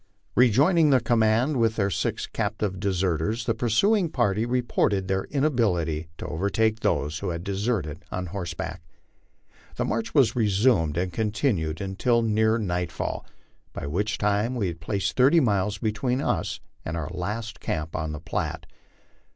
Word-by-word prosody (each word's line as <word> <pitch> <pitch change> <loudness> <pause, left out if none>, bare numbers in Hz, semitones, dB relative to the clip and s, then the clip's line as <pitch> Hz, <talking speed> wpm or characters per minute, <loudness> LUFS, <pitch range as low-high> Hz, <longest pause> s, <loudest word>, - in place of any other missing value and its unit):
Rejoining 145 - +5
the 135 -2 +5
command 115 +4 +2
with 115 -2 +2
their 100 -2 0
six 80 - -1
captive 105 -3 -2
deserters, 95 +2 0
the 115 - +1
pursuing 165 - +2
party 115 -5 +1
reported 120 -6 +1
their 95 0 0
inability 100 - 0
to - - -6
overtake 110 +6 0
those 75 -5 0
who 100 - -3
had 85 0 -4
deserted 95 -6 -2
on 90 0 -3
horseback. 85 -2 -5 0.9
The - - -1
march 115 +4 -2
was 125 -7 +4
resumed 100 - +2
and 90 0 -1
continued 105 - 0
until 115 +5 +1
near 110 0 +2
nightfall, 90 -5 -3 0.5
by - - -5
which 100 +10 -1
time 105 +4 +1
we 100 -7 0
had 85 -1 -7
placed 100 +1 -1
thirty 135 +7 +5
miles 105 -5 +1
between 115 +3 -1
us - - -1 0.2
and 80 +1 -4
our 80 0 -4
last 105 +5 -4
camp 80 -1 -3
on 80 0 -2
the 75 - -5
Platte. 85 +2 -3
105 Hz, 150 wpm, -26 LUFS, 90-115 Hz, 0.9 s, Rejoining